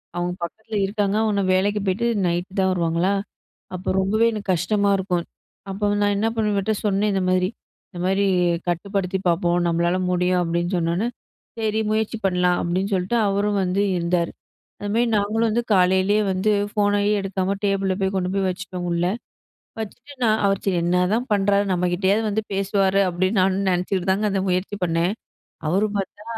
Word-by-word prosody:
அவங்க 175 0 -1
பக்கத்துல 220 +5 -6
இருக்காங்க 200 0 -1
ஆனா, 200 -1 +1
வேலைக்கு 205 +3 +1
போய்ட்டு 210 +6 +1 0.2
நைட்‌ 175 +2 -1
தான் 190 0 +3
வருவாங்களா, 170 +2 +1 0.6
அப்ப 185 +1 -2
ரொம்பவே 215 +4 +2
எனக்கு 210 -2 -6
கஷ்டமா 200 +4 +1
இருக்கும். 180 -3 -1 0.5
அப்போ 200 +2 -3 0.2
நான் 205 0 +2
என்ன 215 +2 +1
பண்ணுவேன், 210 -2 0
இவர்டட 205 +2 0
சொன்னேன் 205 +1 +1
இந்த 190 - +1
மாதிரி. 185 0 +2 0.4
இந்த 180 - -10
மாரி 195 +2 +2 0.4
கட்டுப்படுத்தி 190 +1 -1
பாப்போம். 175 0 +2
நம்மளால 170 +1 +1 0.2
முடியும், 180 0 +2
அப்டின்னு 170 +2 -1
சொன்னோனே 170 +7 0 0.5
சரி, 220 -1 0
முயற்சி 220 +1 0
பண்ணலாம் 180 -1 +2
அப்டின்னு 185 +4 -1
சொல்லிட்டு 190 +6 0
அவரும் 200 +1 0
வந்து 185 +2 0
இருந்தாரு. 170 0 0 0.5
அந்த 205 - -5
மாரி 240 +1 +3
நாங்களும் 220 +3 +1
வந்து 235 +2 +1
காலையிலேயே 190 +3 +3
வந்து 190 +3 +1 0.2
ஃபோனையே 205 0 +2
எடுக்காம 195 0 -1
டேபிள்ல 195 -1 +1
போய் 190 0 0
கொண்டு 180 0 -1
போய் 195 -1 +1
வச்சுட்டோம் 180 -1 -5
உள்ள, 170 0 0 0.8
வச்சுட்டு 245 +6 -8
நான் 220 -1 +3
அவர் 195 -1 +1
சரி 190 -2 +1
என்னதான் 180 +8 +1
பண்றாரு 200 0 +2
நம்ம 180 0 +1
கிட்டேயாவது 195 +4 +2
வந்து 215 +2 0
பேசுவாரு, 195 0 +2
அப்டின்னு 185 +3 0
நானும் 190 +1 +1
நெனச்சிக்கிட்டு 185 +1 -1
தாங்க 205 +3 0
அந்த 195 -1 0
முயற்சி 185 +3 -1
பண்ணேன். 170 +3 +1 0.6
அவரு 195 +6 +2
பாத்தா, 200 +2 -5
195 Hz, 160 wpm, -22 LUFS, 180-205 Hz, 0.8 s, தான்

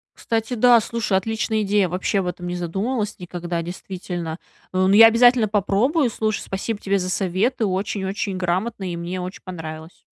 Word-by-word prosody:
Кстати, 225 +1 -2
да, 245 +1 +6
слушай, 225 -3 -1
отличная 220 +2 -1
идея. 200 -2 +2
Вообще 185 +3 -1
об 190 - -1
этом 180 0 -5
не 175 - -3
задумывалась 205 +6 -2
никогда, 175 -1 -4
действительно. 175 -2 -6 0.3
Ну, 185 0 +2
я 220 +3 +9
обязательно 235 0 +5
попробую. 225 - +1
Слушай, 215 -1 -1
спасибо 200 +3 -4
тебе 200 0 +1
за 185 -1 -3
советы, 195 +7 0
очень-очень 195 0 -2
грамотно, 185 +2 -2
и - - -4
мне 175 +2 -4
очень 180 +1 -7
понравилось. 160 -2 -8
195 Hz, 160 wpm, -22 LUFS, 180-220 Hz, 0.3 s, я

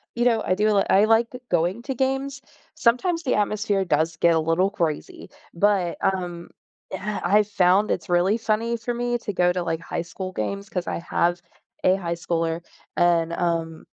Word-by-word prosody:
you 235 - 0
know, 230 -2 +3
I - - +2
do 210 +2 +2
li 200 -2 +3
I 200 +2 +5
like 225 +1 +3 0.2
going 175 +6 0
to 270 +1 -4
games, 270 +1 -1 0.3
sometimes 330 +9 +1
the 260 - +1
atmosphere 210 -1 0
does 165 -2 0
get 170 +1 +4
a - - +3
little 165 +4 +2
crazy, 180 - -3 0.2
but, 185 -1 +1
um, 175 -3 -2 0.4
uh, 205 +2 -3
I 205 +4 +4
found 200 0 +2
it's 170 - -3
really 175 +5 +3
funny 230 +1 -1
for 230 +2 -3
me 240 0 -1
to 210 -3 -5
go 180 -1 +3
to, 180 - -2
like, 165 -1 -2
high - - -4
school 185 +2 -6
games 200 - -4
'cause 180 -2 -3
I - - -2
have 175 +1 0 0.4
a 185 - +5
high 170 -3 -3
schooler, 165 0 -2 0.3
and, 170 -1 +2
um, 165 -2 -2
190 Hz, 185 wpm, -24 LUFS, 170-225 Hz, 0.4 s, I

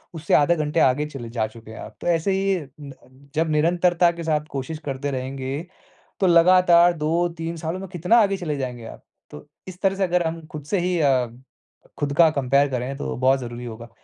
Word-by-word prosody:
उससे 155 -1 -3
आधा 150 +4 +4
घंटा 150 -3 +2
आगे 145 +4 -1
चले 135 -6 -8
जा 115 -2 -1
चुके 110 0 -14
हैं - - -10
आप। - - -10
तो - - -5
ऐसे 170 +2 +1
ही 195 -1 +1 0.2
न 140 -1 -9 0.4
जब 160 +1 +1
निरंतरता 170 +2 +3
के 170 0 -8
साथ 155 -2 0
कोशिश 140 +3 -5
करते 140 0 -3
रहेंगे, 135 +2 -4 0.6
तो 190 - +3
लगातार 175 0 +6
2-3 165 +1 -1
सालों 165 +3 -4
में 195 - -7
कितना 180 +7 +3
आगे 200 -1 +1
चले 155 -5 -3
जाएँगे 125 -3 -5
आप। - - -11 0.3
तो 75 - -11 0.2
इस 185 0 -10
तरह 195 -1 +2
से 195 - +1
अगर 180 -1 +1
हम 165 -1 -7
खुद 150 -2 -7
से 190 +7 -1
ही 180 0 0
अ, 135 -4 +3 0.7
खुद 145 -1 -1
का 165 -1 +6
कंपेयर 140 -1 +2
करें 130 +1 -3
तो 145 - -4
बहुत 130 +2 +3
ज़रूरी 120 0 -7
होगा। 115 0 -8
155 Hz, 205 wpm, -23 LUFS, 135-175 Hz, 0.7 s, लगातार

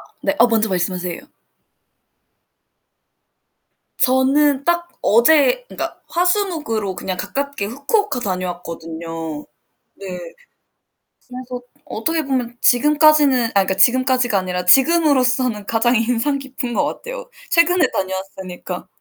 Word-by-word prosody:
아 - - -16 0.2
네. 295 - 0
어, 240 - +6
먼저 220 -1 +1
말씀하세요. 180 -1 -2 2.8
저는 270 +2 +2
딱 345 0 0
어제 315 - +4
그니까 - - -6
화수목으로 335 - -1
그냥 185 +1 -5
가깝게 280 +2 -4
후쿠오카 280 - -1
다녀왔거든요. 165 -5 -5 0.5
네 195 - -10 1.2
그래서 250 0 -8 0.2
어떻게 315 +6 -2
보면 250 -3 -3
지금까지는 295 -1 +4
아, - - -9
그니까 190 - -1
지금까지가 250 +2 +3
아니라 180 -1 -4
지금으로서는 255 - +3
가장 235 +3 +1
인상 240 +5 0
깊은 265 -2 -6
것 - - +1
같아요. - - -7 0.2
최근에 340 0 +4
다녀왔으니까. 190 -1 -5
250 Hz, 280 characters per minute, -19 LUFS, 195-295 Hz, 2.8 s, 어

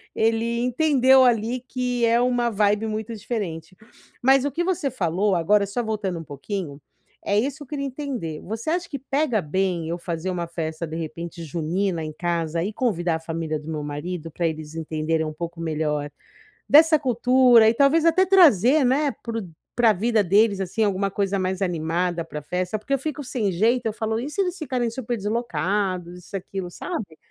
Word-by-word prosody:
ele 230 +1 +1
entendeu 265 0 +4
ali 240 +1 +1
que 250 -1 -1
é 230 +1 +3
uma 245 -1 +1
vibe 210 +1 +2
muito 220 +1 -4
diferente. 200 -6 -5 0.5
Mas 270 +1 +4
o 285 - -1
que 345 - -1
você 345 -6 -1
falou 190 -2 0
agora 200 +4 +3
só 200 +5 -2
voltando 210 -5 -2
um - - -7
pouquinho, 145 +1 -6 0.5
é 200 +1 +2
isso 280 +5 -2
eu - - -16
queria 280 0 -4
entender. 255 - -4
Você 220 - -5
acha 345 +1 -1
que 280 - -5
pega 270 -4 0
bem 175 +1 -1
eu 170 - -2
fazer 170 0 -4
uma 175 -2 -2
festa 160 -1 -4
de 160 - -6
repente 170 +1 -6
junina 170 +3 -2
em 155 0 -5
casa 170 0 -1
e 200 - -2
convidar 175 -9 0
a - - -3
família 160 -1 -3
do 150 - -13
meu 155 -1 -3
marido 160 +3 -5
pra 170 - -2
eles 155 -1 -6
entenderem 160 0 -1
um 155 - -4
pouco 170 +2 -6
melhor 150 -2 -1 0.6
dessa 315 +2 +7
cultura 250 -2 +5
e - - +2
talvez 285 +5 +4
até 335 +3 +4
trazer, 310 - +5
né, 280 +3 +2
pro 225 -4 -4 0.3
pra 235 -2 +5
vida 220 +2 +1
deles 200 +2 +3
assim 190 +4 -1
alguma 195 0 0
coisa 200 0 0
mais 185 +1 -2
animada 175 -1 -1
pra 150 -2 -7
festa, 180 +7 -2
porque 265 +6 -3
eu - - +3
fico 295 +1 -4
sem 235 -6 -1
jeito 230 +7 +1
eu 220 - +1
falo: 220 0 -2
"E 260 +5 -4
se 300 +6 -1
eles 365 -1 -1
ficarem 255 -8 -1
super 240 0 -4
deslocados, 190 -4 -2
isso 180 - -10
e - - 0
aquilo 190 -1 -6
sabe"? 215 - -6
205 Hz, 190 wpm, -23 LUFS, 170-250 Hz, 0.6 s, dessa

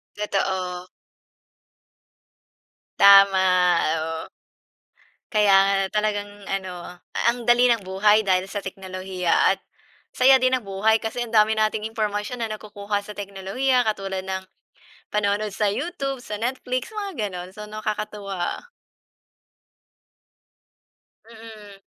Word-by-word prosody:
Totoo. 185 -3 -2 2.1
Tama, 190 -3 +6 0.2
oo. 160 0 -5 1.0
Kaya 210 -2 +4
nga 195 0 +2 0.3
talagang 205 -1 -1 0.2
ano, 180 -2 -6 0.3
ang 240 -1 -9
dali 240 +1 +5
ng 230 - 0
buhay 200 +3 +3
dahil 190 -3 +1
sa 200 +1 -5
teknolohiya 185 -2 -4 0.2
at - - -32 0.5
saya 265 +1 +6
din 255 0 +2
ng 255 - +2
buhay 215 +2 +1
kasi 235 +2 -3
ang 235 - -11
dami 220 0 +4
nating 215 0 0
impormasyon 220 +2 -3
na 220 - -4
nakukuha 205 -1 -4
sa 205 +1 -11
teknolohiya 205 +7 -1
katulad 195 -4 -2
ng 190 0 -3 0.7
panonood 210 0 0
sa 210 +1 -2
YouTube, 275 - -4
sa 210 -4 -6
Netflix, 255 - -3
mga 395 - -4
gano'n. 180 0 -6
So, 210 - -7
nakakatuwa. 210 - -4 2.6
Mm. 215 -3 -13
210 Hz, 110 wpm, -23 LUFS, 190-220 Hz, 2.6 s, Tama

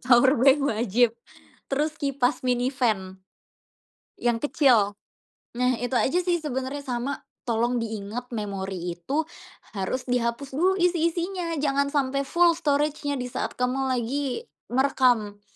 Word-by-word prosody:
power 255 +2 +7
bank 270 +2 +6
wajib, 230 -1 +2 0.6
terus 300 +3 0
kipas 275 -2 0
mini 250 +1 0
fan, 195 -8 -1 1.0
yang 240 -1 +2
kecil. 235 -6 +3 0.7
Nah, 250 -1 +2
itu 245 +2 -3
aja 265 +7 +2
sih 345 -2 +1
sebenernya, 265 0 -3
sama 255 0 -3 0.2
tolong 240 +1 +1
diingat 220 +2 -5
memori 195 -4 -3
itu, 280 - -1 0.5
harus 195 +7 -2
dihapus 245 +2 -1
dulu 370 +4 +4
isi-isinya, 345 0 0
jangan 280 -1 +1
sampe 275 -1 0
full 340 +4 +4
storage-nya 290 -1 0
disaat 250 0 -3
kamu 260 +2 0
lagi 270 - -2 0.2
merekam. 245 -6 +2
255 Hz, 120 wpm, -25 LUFS, 235-285 Hz, 1.0 s, power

